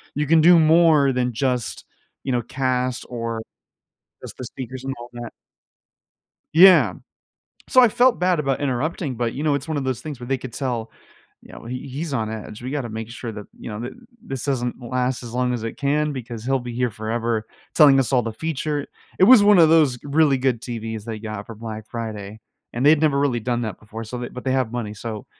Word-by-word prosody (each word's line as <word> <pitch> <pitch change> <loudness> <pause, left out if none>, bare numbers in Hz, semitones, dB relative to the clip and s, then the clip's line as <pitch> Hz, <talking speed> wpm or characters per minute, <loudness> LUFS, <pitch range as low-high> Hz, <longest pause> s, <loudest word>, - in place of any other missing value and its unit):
you 150 - 0
can 165 0 +5
do 175 +2 +7
more 155 -3 +5
than 125 -1 0
just, 125 -1 -2 0.4
you 135 - -2
know, 120 - +1
cast 130 0 -1
or 115 -2 -4 0.8
just - - -9
the 130 - -6
speakers 130 +1 -8
and 135 - -2
all 120 +1 -9
that. 120 -1 -7 1.2
Yeah, 165 - +7 0.8
so, 255 - +6
I 245 - +7
felt 245 +3 +3
bad 180 -3 +2
about 135 -2 -1
interrupting, 140 +1 -2
but, 115 0 -2
you 145 - -4
know, 150 -2 +2
it's 140 +2 -3
one 155 - -2
of 140 - -2
those 130 -2 -2
things 145 -1 -7
where 120 - -8
they 135 +1 0
could 125 -2 -9
tell, 120 -5 -3 0.5
you - - -16
know, - - -11
"He 125 +3 -6
he's 145 +3 -5
on 110 -4 -1
edge. 110 0 -7
We 125 +2 -5
gotta 140 -5 -2
make 110 0 -6
sure 120 0 -6
that, 105 -1 -8
you - - -7
know, 105 +1 -6
thi - - -10 0.3
this 135 - -6
doesn't 125 -3 -2
last 125 +1 -1
as 120 -2 -8
long 125 0 0
as 115 - -4
it 115 - -5
can 150 +1 0
because 120 -3 -7
he'll 135 +1 +1
be 120 -1 -7
here 125 0 0
forever 110 +1 -2 0.3
telling 140 -4 +7
us 130 - -1
all 125 - +4
the 115 -1 -4
feature." 150 +1 -3 0.3
It - - +8
was 220 -1 +8
one 205 -3 +6
of 160 - +7
those 155 -6 +4
really 145 -2 +3
good 125 -3 0
TVs 115 -3 -5
they 110 -2 -6
got 110 -2 -6
for 115 - -9
Black 110 -1 -7
Friday, 110 -2 -6 0.3
and 120 +3 -2
they'd 150 0 +6
never 150 -3 +2
really 135 -4 +1
done 120 +1 -1
that 110 -5 -4
before. 110 +2 -9
So, 125 +3 -6
they 120 0 -5
but 125 - -9
they 130 - +1
have 130 -4 0
money, 115 -4 -4
so 110 0 -7
125 Hz, 220 wpm, -22 LUFS, 115-145 Hz, 1.2 s, It